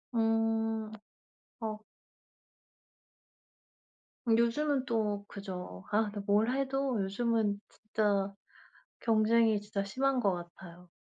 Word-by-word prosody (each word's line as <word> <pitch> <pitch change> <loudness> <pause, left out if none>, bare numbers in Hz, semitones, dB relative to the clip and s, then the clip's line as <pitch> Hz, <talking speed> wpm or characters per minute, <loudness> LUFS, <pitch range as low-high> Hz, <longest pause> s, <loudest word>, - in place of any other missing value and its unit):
음. 225 -1 +1 0.7
아. 215 -1 -3 2.5
요즘은 250 +5 +2
또 210 -3 0
그죠. 180 - -7
아 215 +2 +4
근데 205 - -5
뭘 210 +4 +3
해도 270 -3 0
요즘은 210 0 0
진짜 205 -2 0 0.7
경쟁이 225 -1 +4
진짜 205 -1 -3
심한 260 +6 +1
것 200 -5 +3
같아요. 175 0 -9
220 Hz, 165 characters per minute, -32 LUFS, 200-230 Hz, 2.5 s, 아